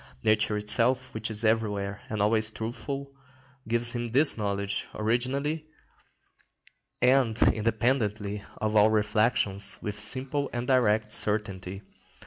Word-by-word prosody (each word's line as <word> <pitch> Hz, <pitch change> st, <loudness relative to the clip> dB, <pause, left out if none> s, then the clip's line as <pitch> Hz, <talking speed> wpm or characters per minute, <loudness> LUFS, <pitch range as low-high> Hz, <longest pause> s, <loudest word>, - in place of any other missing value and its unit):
Nature 110 Hz, 0 st, +2 dB
itself, 125 Hz, +5 st, +1 dB
which 110 Hz, +1 st, -2 dB
is 110 Hz, +1 st, +2 dB
everywhere 105 Hz, -2 st, 0 dB
and 105 Hz, -2 st, -1 dB
always 110 Hz, +1 st, +3 dB
truthful, 135 Hz, +5 st, -5 dB, 0.6 s
gives 120 Hz, +1 st, +1 dB
him 120 Hz, -1 st, -3 dB
this 140 Hz, +6 st, +3 dB
knowledge, 100 Hz, -2 st, -2 dB
originally 135 Hz, +8 st, -1 dB, 1.4 s
and 125 Hz, -3 st, +3 dB
independently 110 Hz, -2 st, -1 dB
of 110 Hz, 0 st, -2 dB
all 105 Hz, 0 st, +6 dB
reflection, 105 Hz, -1 st, +1 dB, 0.2 s
with 105 Hz, -1 st, -5 dB
simple 135 Hz, +5 st, +1 dB
and 120 Hz, 0 st, -3 dB
direct 110 Hz, -5 st, +2 dB
certainty. 100 Hz, -3 st, -1 dB
110 Hz, 110 wpm, -27 LUFS, 105-125 Hz, 1.4 s, all